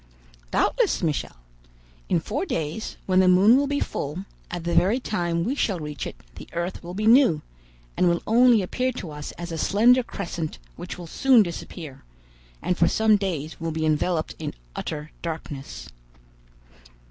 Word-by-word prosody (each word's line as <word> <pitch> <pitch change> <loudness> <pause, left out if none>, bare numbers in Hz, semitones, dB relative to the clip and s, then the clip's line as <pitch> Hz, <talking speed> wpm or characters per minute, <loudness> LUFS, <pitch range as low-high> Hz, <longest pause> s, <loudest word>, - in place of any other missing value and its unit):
"Doubtless, - - +1
Michel. 155 -4 -1 0.7
In - - +3
four 240 - -3
days, 165 - -3
when 185 -1 +3
the 190 - +5
moon 190 +6 +6
will 280 +1 +2
be 285 0 0
full, 155 +7 -3 0.2
at 175 -1 -5
the 170 0 -1
very 205 +8 +3
time 175 -8 -1
we 240 +9 0
shall 200 -10 0
reach 150 -3 -5
it, - - -8 0.2
the - - -10
earth 170 +2 -3
will 175 +1 -7
be 210 +2 -2
new, 230 - +5 0.5
and 180 - +3
will 170 0 0
only 235 -1 +5
appear 255 +7 -1
to 185 -9 -6
us 150 0 -6
as 175 0 -7
a 165 - -4
slender 240 +8 +5
crescent 170 -8 -5 0.2
which 175 +2 -7
will 175 - -8
soon 250 - +4
disappear, 170 -5 -8 0.6
and 180 - 0
for 170 - +5
some 220 +2 +4
days 165 -7 -3
will 165 - -1
be 160 0 -1
enveloped 155 +2 0
in - - -5 0.2
utter 150 -1 -5
darkness." 155 -4 -6
175 Hz, 170 wpm, -25 LUFS, 160-220 Hz, 0.7 s, moon